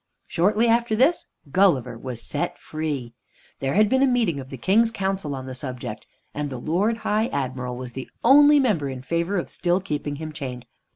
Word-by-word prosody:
Shortly 210 +6 +2
after 230 -1 +2
this, 335 +9 +2 0.2
Gulliver 175 -11 +3
was 120 0 -6
set 145 - -3
free. 145 -6 -4 0.5
There 135 +3 -1
had 215 +1 +5
been 260 +5 +2
a 275 - +5
meeting 230 - +1
of 130 -1 -9
the 135 - -7
King's 215 - +3
Council 190 -8 -2
on 130 -1 -6
the 130 - -6
subject, 125 -5 -6 0.3
and 145 0 -3
the 130 - -5
Lord 185 - 0
High 215 +2 +2
Admiral 130 - -3
was 125 -1 -7
the 130 +1 -7
only 290 +4 +7
member 195 - +1
in 130 -1 -7
favor 170 +7 -1
of 175 - -2
still 175 +1 0
keeping 150 -5 -3
him 155 +1 -6
chained. 130 -5 -6
160 Hz, 190 wpm, -24 LUFS, 130-215 Hz, 0.5 s, only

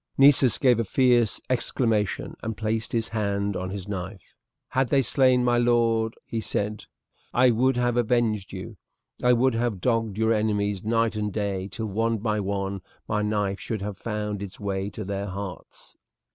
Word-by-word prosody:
Nessus 135 -2 +6
gave 125 -4 +4
a - - +2
fierce 120 -1 +2
exclamation 115 -4 0
and 110 -2 -4
placed 110 0 -2
his 115 -1 -1
hand 100 -2 -1
on 95 +1 -3
his 95 0 -6
knife. 95 -1 -6 0.4
"Had 130 -1 +1
they 135 -1 +3
slain 130 -1 +3
my 120 -1 +3
lord," 115 -2 +2
he 115 - -3
said, 105 0 -3 0.5
"I 125 0 +5
would 125 +3 +2
have 120 -1 +1
avenged 115 -4 +1
you. 100 +3 -8 0.4
I 125 0 +5
would 130 +1 +3
have 115 -4 -1
dogged 115 -2 0
your 110 +1 +3
enemies 105 -2 0
night 115 0 +1
and 105 -1 -2
day 100 -2 -2
till, 110 +3 -5
one 115 +2 0
by 105 0 -1
one, 100 -1 -2 0.3
my 105 - 0
knife 105 -2 -1
should 110 -4 -4
have 100 -2 -5
found 105 -2 -3
its 100 -2 -7
way 100 -1 -2
to 105 +1 -6
their 100 +1 -3
hearts!" 95 -2 -8
110 Hz, 175 wpm, -25 LUFS, 100-120 Hz, 0.5 s, Nessus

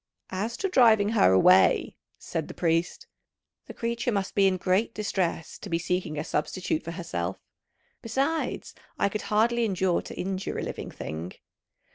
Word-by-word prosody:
"As 215 +5 -3
to 390 - -1
driving 225 - +5
her 215 - +4
away," 95 0 +5 0.2
said - - -4
the - - -9
priest, 165 0 0 0.6
"the - - -8
creature 235 +1 -1
must 200 -3 -2
be 195 -1 +4
in 185 -1 +1
great 185 +5 +1
distress 185 -6 -2
to 200 - -8
be 165 - +1
seeking 170 -2 -2
a 150 - -1
substitute 160 +1 -2
for 170 - -6
herself; 95 - -4 0.6
besides, 275 +8 -2 0.2
I 200 - +2
could 210 +1 -3
hardly 235 +3 +3
endure 190 -4 +1
to - - -9
injure 190 +1 -3
a - - -2
living - - -5
thing." 80 +3 -6
190 Hz, 160 wpm, -27 LUFS, 165-220 Hz, 0.6 s, driving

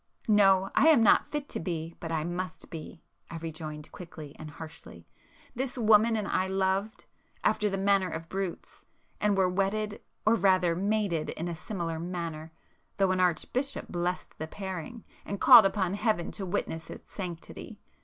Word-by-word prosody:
"No, 195 -3 +5
I 295 - +5
am 300 -8 +6
not 215 - +5
fit 295 -1 -3
to - - -4
be, 165 -1 -4
but 165 - -5
I 160 -2 0
must 175 0 -5
be,"—I 165 +1 -10
rejoined 155 -2 -7
quickly 155 -5 -10
and 155 - -7
harshly—"This 165 - -9
woman 225 0 +5
and 210 -2 -2
I 185 - +1
loved—after 195 +2 -1
the 195 - -2
manner 195 -1 +2
of 165 +1 -6
brutes, 190 -1 -5 0.4
and 210 -1 +2
were 190 -1 +4
wedded 200 +3 -1 0.2
or 215 - +5
rather 185 -4 +3
mated 200 -4 0
in 165 - -4
a 170 - -3
similar 170 -2 -4
manner, 165 -2 -5 0.5
though 195 -2 +3
an 185 - 0
archbishop 215 - -1
blessed 180 +1 -3
the 160 - -4
pairing, 190 +4 -6 0.2
and 200 - -5
called 235 -6 +9
upon 190 -2 -1
Heaven 205 -4 0
to 195 -2 -4
witness 165 -3 -3
its - - -11
sanctity! 175 -4 -7
185 Hz, 155 wpm, -29 LUFS, 165-205 Hz, 0.5 s, called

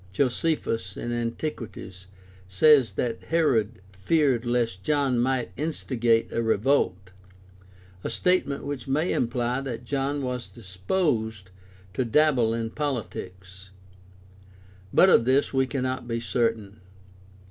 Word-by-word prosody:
Josephus 120 - -1
(Ant., 120 -1 -3
XVIII, 155 -1 -1
v, 115 - -5
2) - - -9 0.6
says 130 +6 +5
that 115 -2 -3
Herod 120 - +1
feared 125 - +1
lest 115 -6 0
John 140 -5 +1
might 130 0 0
instigate 120 -6 0
a 115 - 0
revolt, 110 -5 +1 0.9
a - - -2
statement 180 -6 +1
which 140 -3 -5
may 150 +6 +1
imply 125 +1 -1
that 125 -3 -6
John 140 +2 -1
was 125 -1 -3
disposed 110 - -2 0.4
to 130 - 0
dabble 125 -2 +3
in 115 -1 -2
poHtics. 95 -9 -5 1.2
But 190 - +6
of 115 - +5
this 135 +3 +2
we 130 0 +2
cannot 130 -2 -3
be 115 -1 -2
certain. 115 -3 -2
120 Hz, 120 wpm, -26 LUFS, 115-140 Hz, 1.2 s, But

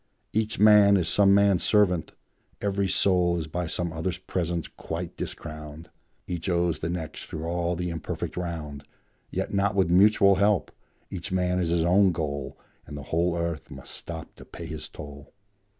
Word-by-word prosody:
Each 110 0 0
man 105 -1 +7
is 90 -3 0
some 100 +1 +4
man's 100 -2 +4
servant; 90 -6 +2 0.5
every 100 -1 0
soul 90 -2 +2
Is 80 - -3
by 85 +2 -3
some 85 +1 -2
other's 80 +1 -2
presence 85 -2 -3
quite - - -6
discrowned; 75 +1 -7 0.3
Each 90 +1 -4
owes 85 -3 +1
the 80 - -3
next 85 -3 -5
through 80 0 -6
all 85 +1 -1
the 90 0 -3
imperfect 80 - -5
round, 80 -5 -5 0.5
Yet - - -3
not 100 +1 +1
with 95 -3 +2
mutual 100 +1 +5
help; 100 0 +2 0.4
each 90 -2 -5
man 90 0 +1
is 85 -2 0
his 85 -1 +2
own 95 +2 +5
goal, 70 -4 -4 0.3
And 75 - -7
the 70 - -7
whole 85 +1 +2
earth 85 -3 -3
must - - -9
stop 80 -2 -8
to - - -11
pay - - -9
his - - -6
toll. 70 -1 -11
85 Hz, 170 wpm, -26 LUFS, 80-95 Hz, 0.5 s, man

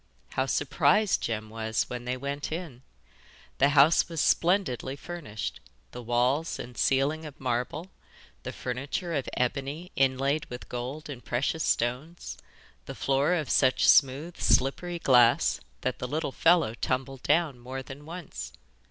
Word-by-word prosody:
How 130 - -1
surprised 150 +9 +2
Jem 110 -1 -3
was 110 0 -1
when 120 0 -6
they 125 +1 -2
went 140 +3 -4
in! 160 -7 -5 0.8
The 140 - +5
house 145 +5 +5
was 165 -2 -4
splendidly 165 - +1
furnished, 140 -10 -6 0.3
the 125 - -7
walls 125 +7 +1
and 120 0 -8
ceiling 140 +6 +1
of 150 -3 -10
marble, 130 +8 -2 0.5
the - - -5
furniture 140 +7 -4
of 140 -4 -2
ebony 140 +8 -2
inlaid 135 +3 +1
with 125 0 -8
gold 125 +5 -5
and 135 -5 -8
precious 140 +6 -1
stones, 130 +9 -1 0.5
the - - -6
floor 140 +6 +2
of 155 -5 -2
such 130 -1 +3
smooth 145 +5 +4
slippery 170 +7 +2
glass 125 -6 +4 0.2
that 130 - -2
the 125 - -3
little 150 +2 -2
fellow 165 -7 +3
tumbled 130 +2 -3
down 160 -7 +1
more 130 +2 -6
than 135 +2 -10
once. 150 - -8
135 Hz, 145 wpm, -28 LUFS, 125-155 Hz, 0.8 s, The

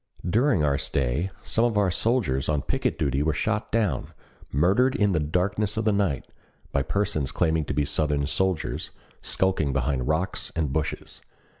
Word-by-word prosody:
During 115 - +3
our 70 -2 +2
stay 70 +8 -1
some 115 - +1
of 120 -3 +1
our 100 -3 +3
soldiers 90 - 0
on 75 -2 +1
picket - - -1
duty 70 0 0
were 75 0 +1
shot 110 +6 -1
down, 105 - 0 0.4
murdered 100 - +3
in 105 -1 +2
the 85 - +2
darkness 95 +7 0
of 110 - 0
the 110 - +4
night, 100 -9 0 0.5
by 70 - +1
persons 80 -2 -1
claiming 80 -2 +1
to - - -3
be 75 0 +2
Southern 75 -1 0
soldiers, 90 +2 -1 0.3
skulking 80 -7 +1
behind 65 -1 0
rocks 80 +5 -1
and 75 -5 -1
bushes. 75 0 -3
80 Hz, 165 wpm, -26 LUFS, 70-100 Hz, 0.5 s, the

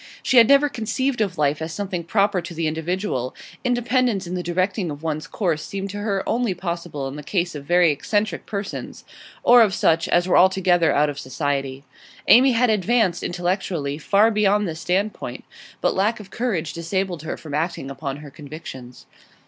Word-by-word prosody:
She 255 - +2
had 230 -2 +8
never 280 +1 +5
conceived 245 +1 -2
of 190 -4 -1
life 145 0 +1
as 160 +1 -4
something 185 -1 -3
proper 200 +2 +1
to 170 0 -8
the 165 0 -1
individual; 160 - -2 0.3
independence 245 -4 +1
in 175 - -6
the 180 - -2
directing 185 +2 -1
of 145 +1 -7
one's 155 -1 -3
course 170 -7 -1
seemed 195 0 -5
to 205 - -6
her 200 -2 -2
only 235 -5 0
possible 170 -5 -4
in 135 +2 -7
the - - -6
case 175 +3 -1
of 145 -2 -8
very 175 0 +4
eccentric 205 +8 -2
persons, 200 -1 -5 0.4
or 245 0 +7
of 205 -4 +3
such 165 +1 +2
as 175 +1 +2
were 185 - +5
altogether 180 -3 +4
out 145 +1 +2
of 145 - -8
society. 135 0 -3 0.4
Amy 255 +2 +7
had 240 0 +3
advanced, 210 -3 +1
intellectually, 175 -5 -2
far 205 +7 +3
beyond 210 -1 +2
this 160 -1 -5
standpoint, 195 +5 -2 0.4
but - - +2
lack 210 +4 +1
of 200 -2 -12
courage 195 - -2
disabled 175 0 -2
her 155 - -5
from 155 -3 -9
acting 155 -2 -2
upon 135 0 -5
her 145 - -11
convictions. 135 -4 -10
180 Hz, 180 wpm, -22 LUFS, 155-210 Hz, 0.4 s, had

